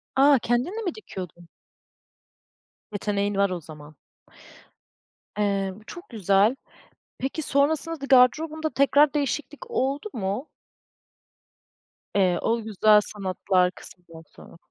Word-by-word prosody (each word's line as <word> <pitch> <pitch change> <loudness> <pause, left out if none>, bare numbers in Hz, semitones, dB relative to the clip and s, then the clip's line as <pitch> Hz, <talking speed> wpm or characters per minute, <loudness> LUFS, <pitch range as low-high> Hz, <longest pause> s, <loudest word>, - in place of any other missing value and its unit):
A, 275 0 +5
kendin 240 +8 0
de - - -3
mi 355 - -2
dikiyordun? 180 - -9 1.4
Yeteneğin 205 0 -2
var 200 0 +2
o 180 -2 -4
zaman. 150 -1 -13 1.4
Eee, 200 -2 0
bu - - -19
çok 345 - -11
güzel. 205 +1 +2 0.6
Peki, 270 +4 -3
sonrasında 305 +2 0
da - - -3
gardırobunda 310 +5 +3
tekrar 285 +1 +3
değişiklik 300 - -3
oldu 285 - -1
mu? 210 +5 -3 1.7
Eee, 185 -3 +2
o 230 +1 0
güzel 215 0 +4
sanatlar 185 -2 0
kısmından 170 -3 -11
sonra. - - -15
220 Hz, 110 wpm, -25 LUFS, 195-285 Hz, 1.7 s, A